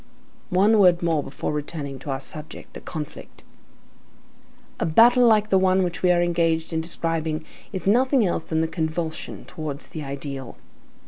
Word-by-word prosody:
One 205 Hz, +4 st, +4 dB
word 180 Hz, -3 st, +5 dB
more 165 Hz, -3 st, +2 dB
before 135 Hz, +1 st, -4 dB
returning 145 Hz, -2 st, -5 dB
to 150 Hz, -, -9 dB
our 135 Hz, -1 st, -1 dB
subject, 150 Hz, +2 st, -9 dB
the -, -, -9 dB
conflict. 150 Hz, -3 st, -8 dB, 1.4 s
A -, -, 0 dB
battle 240 Hz, +8 st, +6 dB
like 215 Hz, -2 st, +4 dB
the 190 Hz, -, +5 dB
one 190 Hz, 0 st, +3 dB
which 175 Hz, -2 st, -3 dB
we 180 Hz, -, +4 dB
are 175 Hz, 0 st, +3 dB
engaged 165 Hz, -2 st, 0 dB
in 160 Hz, -, 0 dB
describing 160 Hz, -1 st, -2 dB, 0.3 s
is 190 Hz, -4 st, -5 dB
nothing 250 Hz, +3 st, +4 dB
else 170 Hz, -3 st, -1 dB
than 160 Hz, 0 st, 0 dB
a -, -, 0 dB
convulsion 160 Hz, 0 st, -4 dB
towards 155 Hz, -2 st, -6 dB
the 155 Hz, -, -6 dB
ideal. 140 Hz, -2 st, -6 dB
165 Hz, 165 wpm, -24 LUFS, 155-185 Hz, 1.4 s, battle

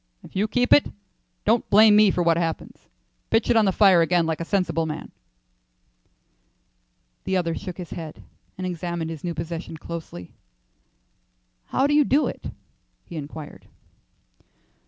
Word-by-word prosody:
If -, -, -15 dB
you 200 Hz, +3 st, +1 dB
keep 245 Hz, +2 st, +2 dB
it, 290 Hz, -, +5 dB, 0.6 s
don't 225 Hz, +2 st, +2 dB
blame 210 Hz, +1 st, +7 dB
me 210 Hz, -1 st, +6 dB
for 180 Hz, -1 st, 0 dB
what 170 Hz, -1 st, +3 dB
happens. 165 Hz, -1 st, -4 dB, 0.4 s
Pitch 225 Hz, 0 st, +2 dB
it -, -, +3 dB
on 220 Hz, -2 st, +5 dB
the 195 Hz, -, +3 dB
fire 190 Hz, -3 st, +5 dB
again 170 Hz, 0 st, +2 dB
like 160 Hz, 0 st, -2 dB
a -, -, -3 dB
sensible 165 Hz, -4 st, 0 dB
man." 155 Hz, -, -6 dB, 2.1 s
The 190 Hz, -, 0 dB
other 170 Hz, -2 st, -1 dB
shook 180 Hz, +1 st, -7 dB
his 180 Hz, -4 st, -8 dB
head 160 Hz, -2 st, -8 dB, 0.3 s
and 185 Hz, -, -4 dB
examined 170 Hz, -2 st, -4 dB
his 160 Hz, -3 st, -8 dB
new 170 Hz, -2 st, -3 dB
possession 165 Hz, +1 st, -6 dB
closely. 155 Hz, -, -8 dB, 1.3 s
"How 265 Hz, -, 0 dB
do 290 Hz, -, +2 dB
you 295 Hz, 0 st, +5 dB
do 285 Hz, +3 st, +2 dB
it?" -, -, -6 dB, 0.6 s
he 170 Hz, -, -10 dB
inquired. 150 Hz, 0 st, -8 dB
175 Hz, 155 wpm, -24 LUFS, 165-210 Hz, 2.1 s, blame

